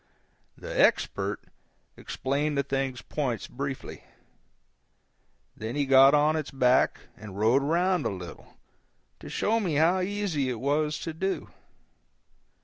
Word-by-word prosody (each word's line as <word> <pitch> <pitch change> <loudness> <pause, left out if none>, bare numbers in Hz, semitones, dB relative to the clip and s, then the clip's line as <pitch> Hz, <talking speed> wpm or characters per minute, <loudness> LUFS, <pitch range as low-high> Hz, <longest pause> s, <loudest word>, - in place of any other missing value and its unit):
The - - -5
Expert - - +2 0.5
explained 145 +2 -2
the 140 - +2
thing's 135 -2 -3
points 130 -7 -3
briefly, 140 +1 -6 1.5
then 110 +2 -5
he 145 -1 +1
got 135 +1 +7
on 150 +1 +3
its 155 -3 -3
back 130 -2 +2
and 105 -2 -10
rode 115 +6 +3
around 175 +3 +1
a - - -1
little, 90 -3 -9 0.6
to - - -10
show 225 +2 +1
me 180 -8 -1
how 165 +5 +3
easy 185 -8 -1
it 120 -3 -3
was 150 +3 0
to 165 - -4
do. 190 +4 -3
145 Hz, 130 wpm, -27 LUFS, 130-165 Hz, 1.5 s, got